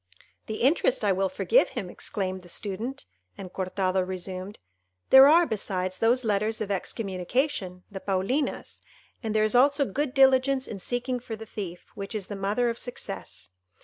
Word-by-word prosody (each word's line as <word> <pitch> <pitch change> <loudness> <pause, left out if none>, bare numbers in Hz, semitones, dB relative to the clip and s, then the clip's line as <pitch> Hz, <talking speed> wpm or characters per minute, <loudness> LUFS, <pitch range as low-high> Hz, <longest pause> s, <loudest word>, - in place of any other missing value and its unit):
"The 220 +1 -3
interest 270 -3 +3
I 200 - +4
will 190 0 +1
forgive - - +3
him," - - -5
exclaimed 185 -2 -4
the 175 - -15
Student; 215 +8 -4 0.3
and 185 -2 -9
Cortado 185 0 0
resumed:—"There 185 - +2
are, 335 +4 +6
besides, 185 - -3
those 240 +3 +3
letters 215 +1 0
of 205 -2 -3
excommunication, 190 - -2
the 195 - -6
Paulinas; 200 +10 -2 0.4
and 220 -3 -3
there 215 - +4
is 215 - +2
also 280 +3 +4
good 275 +5 -2
diligence 265 0 +4
in 200 - -6
seeking 245 +5 -2
for 235 -2 -6
the 225 +1 -9
thief, 190 -5 -7
which 200 +3 -6
is 205 -3 -2
the 205 - -4
mother 205 +5 0
of 230 - -7
success. 195 - -5
210 Hz, 160 wpm, -27 LUFS, 185-250 Hz, 0.4 s, are